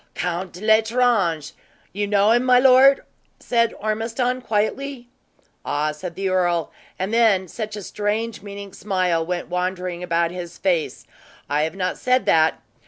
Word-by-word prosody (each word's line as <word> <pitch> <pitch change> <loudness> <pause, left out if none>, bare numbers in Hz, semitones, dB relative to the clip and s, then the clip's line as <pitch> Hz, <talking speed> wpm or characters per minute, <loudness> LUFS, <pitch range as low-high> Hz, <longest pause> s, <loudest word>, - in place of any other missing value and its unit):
"Count 180 0 -4
L'Estrange. 220 - +2 0.4
You 205 +1 -2
know 205 +1 +3
him, 240 +2 +3
my 250 -1 +5
lord?" 265 +2 +6 0.4
said 230 -1 +1
Ormiston, 225 +4 -1
quietly. 245 +3 -2 0.5
"Ah!" 150 +1 -1
said 165 +3 -8
the 195 0 -2
earl. 175 -3 0 0.3
And 190 +4 -3
then 215 -5 +3
such 215 +3 -6
a 205 - -7
strange 210 +3 -3
meaning 200 -1 -9
smile 185 -4 0
went 175 +1 -4
wandering 180 0 -3
about 170 -1 0
his 175 -1 -7
face. 175 -5 -1 0.4
"I 145 +1 0
have 160 +2 -2
not 185 -1 -2
said 255 0 +2
that! 160 0 +2
200 Hz, 145 wpm, -22 LUFS, 175-225 Hz, 0.5 s, lord